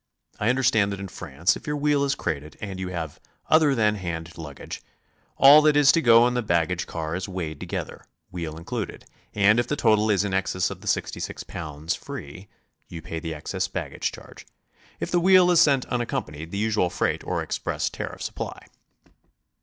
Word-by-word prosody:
I 105 - +1
under 130 +2 +1
stand 110 -5 +3
that 100 - -5
in 100 -1 -6
France 85 -1 -1
if - - -11
your 150 0 -1
wheel 145 -1 +2
is 140 -1 +1
crated 75 -2 -4
and 100 -3 -6
you 95 - -3
have 85 -5 -5 0.3
other 155 -3 +5
than 105 -3 +3
hand 85 -4 -5
luggage, 75 -4 -8 0.6
all 145 +3 +9
that 150 -1 +4
is 145 -2 +7
to 165 - +2
go 120 -2 +6
in 125 - -1
the 125 - 0
baggage 85 -7 0
car 80 -1 -4
is 90 +1 -4
weighed 85 -5 -5
together, - - -5 0.3
wheel 80 -3 -5
included, 85 - -5 0.3
and 105 +2 +5
if 120 - 0
the 150 - -1
total 110 -5 +3
is 100 -2 +3
in 100 -2 -3
excels 95 -1 0
of - - -8
the - - -11
66 - - -2
pounds 80 -1 -5
free, 90 +8 -8 0.4
you 85 - -8
pay 80 +1 -6
the 80 0 -5
excess 75 - -3
baggage - - -3
charge. - - -13 0.5
If - - -4
the 175 - +3
wheel 185 0 +6
is 175 - +6
sent 140 -3 +4
unaccompanied, 80 -10 -3
the 100 - -5
usual 105 -3 +1
freight 90 - -1
or - - -2
express - - -2
tariffs - - -5
apply. - - -7
100 Hz, 195 wpm, -25 LUFS, 80-125 Hz, 0.6 s, all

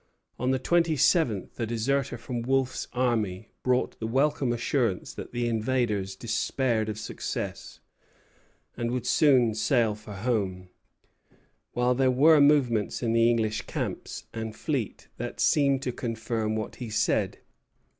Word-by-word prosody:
On 125 - 0
the 130 - +2
twenty 165 +4 +2
seventh 130 - +1
a 115 - -1
deserter 120 +3 -1
from 120 +1 -4
Wolfe's 130 +1 0
army 115 -6 -1
brought 125 0 0
the 110 - -3
welcome 135 +1 +1
assurance 120 -4 -1
that - - -8
the 120 0 -1
invaders 110 -4 0
despaired 115 +1 -1
of 105 - -4
success, 110 - -5 1.0
and 120 0 -2
would 125 0 -2
soon 125 -6 +4
sail 115 0 +2
for 105 0 -10
home; 95 -4 -2 1.0
while 125 +1 +2
there 130 +1 +2
were 145 +4 +6
movements 130 -8 +3
in 115 -1 +1
the 115 0 +4
English 110 -2 0
camps - - -4
and 110 -1 -5
fleet 130 -4 -3
that - - -5
seemed 140 -2 +3
to 125 - -1
confirm 115 -2 -2
what 110 -1 -4
he 120 -3 -6
said. 105 0 0
120 Hz, 140 wpm, -27 LUFS, 110-130 Hz, 1.0 s, were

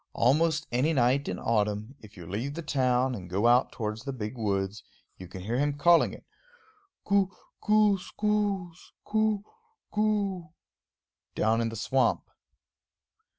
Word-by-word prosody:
Almost 155 +5 +2
any 130 +7 +2
night 135 +1 +2
in - - -3
autumn, 105 +1 -1
if 105 -2 -15
you 85 - -9
leave 115 - -4
the 170 - -5
town 130 -3 +1
and 90 -6 -7
go 100 +5 0
out 120 +1 +4
towards 110 -1 -4
the 135 +2 -5
big 110 -2 -5
woods, 100 -3 -2 0.4
you 90 - -9
can 95 +1 -9
hear 115 +7 -2
him 145 0 +1
calling 170 +3 +5
it, - - -12 0.8
Koo 200 -2 +3 0.3
koo 210 -2 +3
skoos, 200 -3 -2
koooo, 215 -1 +1 0.5
kooo, 200 -6 -1 0.8
down 110 +2 +2
in 115 - 0
the 115 - -7
swamp. 130 +5 +1
130 Hz, 145 wpm, -28 LUFS, 110-180 Hz, 0.8 s, calling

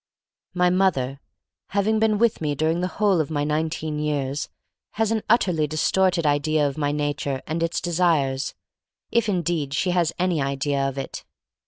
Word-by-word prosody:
My 180 0 +3
mother, 185 -6 +3
hav 125 +1 -3
8 140 - -18
THE - - -47
STORY - - -53
OF - - -63
MARY 205 - -8
MAC 200 - +3
LANE 220 - +2
ing 220 - +2
been - - 0
with 230 -5 +2
me 150 -2 -1
during 160 +3 +1
the 180 - 0
whole 200 -5 +3
of 150 - -4
my 145 -2 -1
nineteen 155 0 -2
years, 145 -2 -2 0.4
has 220 0 0
an 220 -1 +1
utterly 180 -9 +3
dis 155 +1 0
torted 185 -3 +2
idea 145 +1 +2
of 140 - -4
my 145 -2 0
nature 145 -2 -2
and 160 +1 -3
its 165 0 0
de 175 - -4
sires, 145 -6 +1 0.6
if 235 -2 +2
indeed 170 -6 -1
she 180 +4 +1
has 175 -2 +2
any 180 -4 +1
idea 140 +1 -1
of 135 - -9
it. 135 - -5
155 Hz, 215 wpm, -24 LUFS, 145-180 Hz, 0.6 s, My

